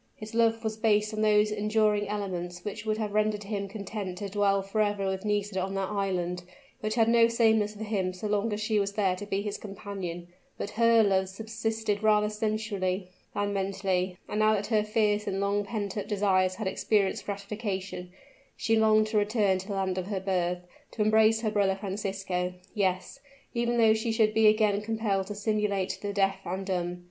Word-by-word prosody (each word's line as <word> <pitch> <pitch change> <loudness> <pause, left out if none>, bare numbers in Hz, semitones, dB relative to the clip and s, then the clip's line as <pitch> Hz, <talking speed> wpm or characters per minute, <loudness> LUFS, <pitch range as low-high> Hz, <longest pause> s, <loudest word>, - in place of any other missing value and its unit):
His 215 0 -9
love 225 0 +2
was 220 -1 -2
based 215 -1 +2
on 215 - -2
those 210 0 +4
enduring 210 0 +1
elements 180 -4 -4
which 210 +1 -5
would 215 0 +1
have 210 -2 -3
rendered 215 0 +1
him 200 -1 -3
content 200 -2 -5
to 200 +1 -4
dwell 200 -1 +2
forever 205 0 0
with 190 +1 -2
Nisida 205 -2 0
on 190 +1 -3
that 195 +1 -2
island, 180 -3 -1 0.4
which 215 0 -2
had 225 -2 +4
no 230 0 +6
sameness 220 -2 +2
for 215 - -6
him 200 -4 -1
so 185 +3 -8
long 210 +1 0
as 210 - -2
she 215 0 +1
was 200 0 -1
there 195 -3 +1
to 205 +2 -8
be 200 0 -1
his 205 -1 -4
companion; 195 -4 -6 0.3
but 205 - -4
her 230 0 +5
love 190 -2 +2
subsisted 220 0 -2
rather 210 -1 +3
sensually 210 -4 -2 0.2
than 205 0 0
mentally; 190 -2 -1
and 210 - -2
now 215 0 +4
that 205 0 -2
her 215 -2 +2
fierce 210 -1 +1
and 195 -1 -1
long 200 +1 +1
pent 205 -1 -4
up 205 - -3
desires 190 -3 +2
had 215 +1 -5
experienced 195 +1 0
gratification, 200 -3 -4 0.5
she 225 - +1
longed 215 -1 +4
to 215 0 +1
return 205 -2 +2
to 190 - -9
the 200 - -3
land 190 -1 -1
of 185 - -5
her 200 -2 -2
birth, 180 -2 -1 0.3
to 215 - -1
embrace 220 +1 +4
her 220 -2 0
brother 200 -2 +2
Francisco; 190 -2 -3 0.2
yes, 185 +3 -1 0.3
even 240 0 0
though 225 -2 +6
she 220 +1 -1
should 220 -1 +2
be 220 0 +5
again 210 -1 +3
compelled 210 -3 -1
to 205 - -5
simulate 205 -2 -1
the 205 - -3
deaf 195 -1 +1
and 190 +2 -4
dumb. 180 -2 -2
205 Hz, 195 wpm, -28 LUFS, 195-215 Hz, 0.5 s, no